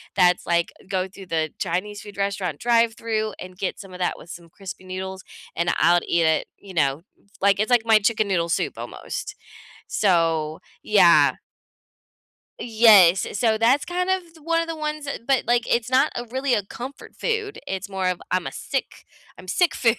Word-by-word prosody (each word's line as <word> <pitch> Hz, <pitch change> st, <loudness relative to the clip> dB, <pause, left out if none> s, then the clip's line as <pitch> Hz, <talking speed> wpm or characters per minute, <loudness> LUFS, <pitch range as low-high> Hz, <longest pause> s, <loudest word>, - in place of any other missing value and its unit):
that's 180 Hz, 0 st, +3 dB
like, 170 Hz, 0 st, +1 dB
eh, -, -, -20 dB
go 190 Hz, -1 st, -1 dB
through 195 Hz, 0 st, -12 dB
the 160 Hz, -2 st, -1 dB
Chinese 200 Hz, +4 st, -3 dB
food 205 Hz, -1 st, -12 dB
restaurant 195 Hz, -6 st, -2 dB
drive-through, 230 Hz, -2 st, +1 dB
and 185 Hz, 0 st, -10 dB
get 195 Hz, -1 st, -3 dB
some 195 Hz, -2 st, -11 dB
of 180 Hz, -, -9 dB
that 180 Hz, -, 0 dB
with 170 Hz, -, -14 dB
some 170 Hz, -1 st, -10 dB
crispy 190 Hz, +2 st, -9 dB
noodles, 190 Hz, 0 st, -6 dB, 0.3 s
and 170 Hz, +1 st, +1 dB
I'll 170 Hz, +2 st, +5 dB
eh -, -, +3 dB
eat 170 Hz, -1 st, +2 dB
it, 160 Hz, 0 st, +1 dB
you 195 Hz, -2 st, -12 dB
know. 140 Hz, -2 st, +1 dB, 0.4 s
Like, 200 Hz, 0 st, +3 dB
it's 215 Hz, +4 st, 0 dB
like 240 Hz, -2 st, +4 dB
my 225 Hz, -1 st, +6 dB
chicken 215 Hz, 0 st, +1 dB
noodle 170 Hz, -3 st, 0 dB
soup, -, -, 0 dB
almost. -, -, -6 dB, 0.5 s
So, 165 Hz, -5 st, +1 dB, 0.2 s
yeah. -, -, +5 dB, 1.3 s
Yes, 210 Hz, -6 st, +6 dB
eh, -, -, -7 dB
so 220 Hz, 0 st, +2 dB
that's 240 Hz, +6 st, +3 dB
kind 360 Hz, +1 st, -2 dB
of 375 Hz, 0 st, +2 dB
th 335 Hz, -1 st, -21 dB
one 330 Hz, +1 st, +1 dB
of 330 Hz, -, -4 dB
the 330 Hz, -, -4 dB
ones 305 Hz, -1 st, -4 dB
that, 275 Hz, -, -5 dB
but, 270 Hz, -2 st, +2 dB
like, 240 Hz, 0 st, +3 dB
it's 235 Hz, 0 st, 0 dB
not 260 Hz, +4 st, +3 dB
a 240 Hz, -, -4 dB
really 260 Hz, +2 st, -1 dB
a 210 Hz, -, +1 dB
comfort 250 Hz, +7 st, -9 dB
food, 440 Hz, -3 st, -2 dB
it's 190 Hz, +1 st, -4 dB
more 190 Hz, -1 st, -2 dB
of 180 Hz, -, -3 dB
I'm 185 Hz, -1 st, 0 dB
a -, -, -4 dB
sick 270 Hz, -, -5 dB, 0.3 s
I'm 185 Hz, -, -13 dB
sick 345 Hz, -, +2 dB
food. 230 Hz, -1 st, +3 dB
200 Hz, 200 wpm, -23 LUFS, 180-240 Hz, 1.3 s, my